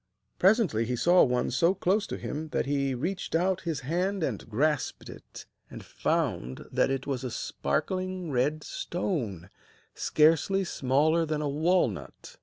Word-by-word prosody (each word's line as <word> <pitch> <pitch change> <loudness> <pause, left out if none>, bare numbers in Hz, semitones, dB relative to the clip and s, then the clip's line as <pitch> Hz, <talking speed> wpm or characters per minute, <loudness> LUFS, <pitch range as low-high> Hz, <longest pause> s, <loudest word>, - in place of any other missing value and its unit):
Presently 185 - +3
he 125 +2 -1
saw 175 +8 +5
one 125 -1 +1
so 165 +9 +3
close 200 +3 +1
to - - -4
him 155 +2 -5
that - - -1
he 140 -1 0
reached 175 +7 -3
out 185 +2 +1
his 150 -5 -2
hand 180 +7 -1
and 120 -8 -3
grasped 140 +4 -1
it, - - -12 0.2
and - - -10
found 65 +1 -2
that - - +2
it 135 0 -2
was 135 -2 -3
a 130 - -2
sparkling 185 - -2
red 145 +4 0
stone, 115 - -3 0.4
scarcely 165 +5 +3
smaller 155 +1 +2
than 155 -1 -2
a - - 0
walnut. 145 - -1
150 Hz, 150 wpm, -28 LUFS, 125-180 Hz, 0.4 s, saw